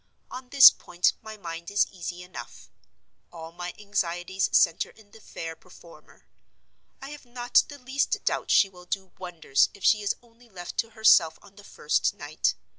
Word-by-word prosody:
On 255 0 -9
this 275 0 +10
point 175 0 0
my 220 0 -10
mind 170 -3 -8
is 200 0 +2
easy 180 -1 -7
enough: 180 - -11 0.6
all 165 -1 -10
my 175 +1 -7
anxieties 190 -2 -2
center 165 -2 +3
in 210 -2 -21
the 220 - -16
fair 165 -4 -8
performer. 170 0 -18 0.8
I 275 - -8
have 295 - -11
not 245 0 +1
the 290 - -11
least 265 +1 -2
doubt - - -1
she 200 - +5
will 180 -2 -16
do 190 0 -5
wonders 170 -7 0
if 200 - -16
she 215 - +4
is 205 - -1
only 235 0 -23
left 175 -4 -9
to 230 - 0
herself 170 -7 +5
on 195 - -19
the 205 - -15
first 150 -6 -1
night. 145 +2 -2
190 Hz, 175 wpm, -26 LUFS, 175-220 Hz, 0.8 s, this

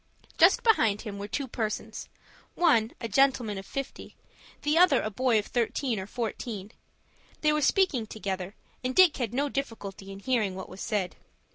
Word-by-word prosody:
Just - - +6
behind 220 - +3
him 205 -3 -7
were 200 - -5
two 270 +6 -3
persons,—one, 225 +3 -2
a 230 - -3
gentleman 235 -3 +2
of 195 - -10
fifty; 275 -1 -6 0.5
the 295 +1 +2
other, 360 +2 +6
a 215 - -3
boy 245 +2 +2
of 210 - 0
thirteen 240 -1 -1
or 190 - -6
fourteen. 220 -3 -5 0.7
They 300 -1 +3
were 300 - +1
speaking 290 - +2
together, 195 -2 -4 0.3
and 255 0 -2
Dick 370 -4 +6
had 240 -5 -2
no 280 +4 0
difficulty 220 -8 -5
in 195 - -8
hearing 210 -3 0
what 190 - -7
was 195 - -10
said. 205 -5 -2
225 Hz, 165 wpm, -28 LUFS, 205-275 Hz, 0.7 s, Just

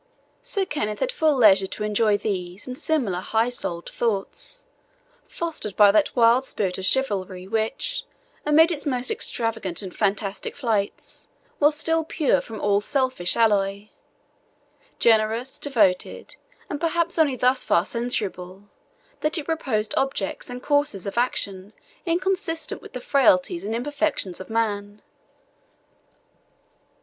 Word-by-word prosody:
Sir 445 -6 0
Kenneth 215 - -3
had - - 0
full 315 - +2
leisure 195 -6 +5
to 210 - -5
enjoy 210 0 +2
these 185 -3 -4
and 255 - -6
similar 255 - 0
high 225 +5 +1
souled 175 -8 -4
thoughts, 230 - -3 0.6
fostered 325 - -4
by 205 -1 +7
that 210 -1 +2
wild 240 +1 +5
spirit 190 -8 -3
of 190 - -3
chivalry, 190 -8 -1
which, 225 - -2 0.4
amid 320 +3 +5
its 305 - -2
most 250 -2 +1
extravagant 225 -6 -2
and 185 -2 -8
fantastic 200 -1 -1
flights, 225 -7 -3 0.3
was 295 +1 +4
still 325 +2 +1
pure 310 -2 +1
from 220 -2 -8
all 205 0 +2
selfish 255 -7 0
alloy 205 -2 +1 1.1
generous, 225 +3 +2
devoted, 220 -10 0 0.3
and 290 - -5
perhaps 335 0 0
only 290 -5 +3
thus 255 +1 +2
far 170 - +2
censurable, 200 -6 -4 0.6
that 305 +3 0
it 305 - -4
proposed 260 -10 -1
objects 270 -7 -2
and 245 0 -7
courses 285 -10 +1
of 200 - -4
action 205 -5 -1 0.3
inconsistent 350 -1 -1
with 420 - -13
the 250 - -5
frailties 185 -11 +3
and 220 +2 -2
imperfections 280 - -1
of 190 - -9
man. 210 -2 -2
230 Hz, 130 wpm, -24 LUFS, 200-290 Hz, 1.1 s, by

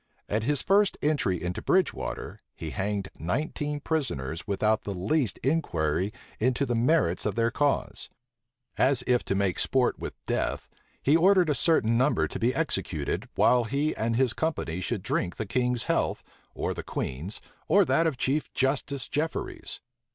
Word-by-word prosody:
At 110 +2 0
his 145 +4 0
first 200 +1 +3
entry 145 - +1
into 90 +1 -3
Bridge 185 -4 +3
water, - - -5 0.2
he 80 -2 -6
hanged 100 -1 -2
nineteen 150 - -2
prisoners 85 - -2
without 105 +2 +1
the 100 - -4
least 105 - 0
inquiry 95 - 0 0.3
into 130 +4 +2
the 120 - -1
merits 120 - +2
of 105 - -1
their 115 0 +2
cause. 145 +3 0 0.7
As 135 -1 +3
if 125 -1 +2
to 100 - 0
make 95 -2 0
sport 130 -2 +2
with - - -5
death, - - -1 0.4
he 145 - +4
ordered 180 -1 +5
a - - +3
certain 120 -6 +3
number 135 +4 +2
to - - -6
be 120 +2 +2
executed, 95 - -2
while 125 -1 +4
he 140 +6 0
and 115 +1 0
his 125 -1 +2
company 115 - -2
should - - -2
drink 90 - -1
the 110 - -3
king's 125 +2 0
health, - - 0 0.3
or - - -1
the - - -5
queen's, 80 +11 -4 0.3
or 200 -1 +5
that 165 -1 +3
of 150 -5 -1
Chief 135 +4 0
Justice 135 0 0
Jefferies. 155 +3 -3
125 Hz, 165 wpm, -27 LUFS, 100-150 Hz, 0.7 s, ordered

